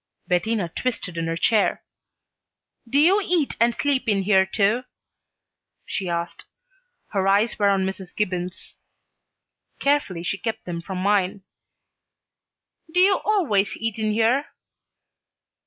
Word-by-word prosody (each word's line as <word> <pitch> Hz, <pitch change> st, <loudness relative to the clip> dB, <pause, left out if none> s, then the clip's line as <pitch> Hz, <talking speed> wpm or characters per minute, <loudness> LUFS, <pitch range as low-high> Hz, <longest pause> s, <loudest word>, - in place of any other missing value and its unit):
Bettina 195 Hz, +2 st, 0 dB
twisted 190 Hz, -1 st, -4 dB
in 165 Hz, 0 st, -2 dB
her 165 Hz, 0 st, -2 dB
chair. 215 Hz, +4 st, +2 dB, 1.1 s
"Do 280 Hz, -, +3 dB
you 375 Hz, +7 st, +5 dB
eat 345 Hz, -6 st, 0 dB
and 235 Hz, +1 st, +3 dB
sleep 280 Hz, -5 st, 0 dB
in 200 Hz, -2 st, +1 dB
here, 190 Hz, -1 st, +4 dB
too?" 210 Hz, +4 st, +1 dB, 1.0 s
she 190 Hz, -2 st, -3 dB
asked. 170 Hz, 0 st, -4 dB, 0.6 s
Her 195 Hz, -2 st, 0 dB
eyes 205 Hz, +4 st, +2 dB
were 205 Hz, -1 st, +4 dB
on 195 Hz, -1 st, +2 dB
Mrs. 190 Hz, -1 st, -6 dB
Gibbons. 180 Hz, -3 st, -3 dB, 1.0 s
Carefully 280 Hz, -12 st, 0 dB
she 195 Hz, +2 st, -2 dB
kept 225 Hz, -1 st, -4 dB
them 170 Hz, -1 st, -4 dB
from 190 Hz, +2 st, -6 dB
mine. 195 Hz, 0 st, +1 dB, 1.5 s
"Do 360 Hz, -, +1 dB
you 385 Hz, +1 st, +5 dB
always 275 Hz, -, +1 dB
eat 225 Hz, 0 st, -3 dB
in 215 Hz, 0 st, 0 dB
here?" 230 Hz, +6 st, +2 dB
205 Hz, 125 wpm, -23 LUFS, 190-240 Hz, 1.5 s, you